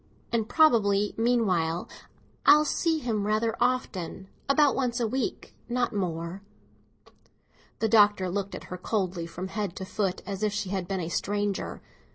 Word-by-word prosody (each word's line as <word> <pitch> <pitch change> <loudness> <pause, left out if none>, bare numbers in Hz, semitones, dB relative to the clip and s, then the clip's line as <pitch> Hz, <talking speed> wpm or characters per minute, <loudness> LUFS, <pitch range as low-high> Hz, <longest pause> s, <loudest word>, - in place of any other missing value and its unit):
And 225 -1 0
probably, 210 -10 +4
meanwhile, 190 -8 +1 0.6
I - - +3
shall 300 +1 +4
see 325 +2 +1
him 220 -8 -1
rather 220 +1 +1
often; 195 -7 -1 0.2
about 285 0 +5
once 250 -2 -1
a 235 - +1
week, 260 +4 -3 0.2
not 245 0 0
more." 175 -1 -3 1.4
The 225 - +1
Doctor 205 -3 +5
looked 195 +2 -3
at - - -8
her - - -4
coldly 185 -4 -2
from 180 +2 -6
head 205 -3 -3
to 190 - -5
foot, 195 -1 -2
as 200 -1 -5
if 210 -1 +1
she 205 -2 -2
had 190 -3 -2
been 195 -2 -2
a 165 - -4
stranger. 205 +2 -2
205 Hz, 160 wpm, -27 LUFS, 190-235 Hz, 1.4 s, about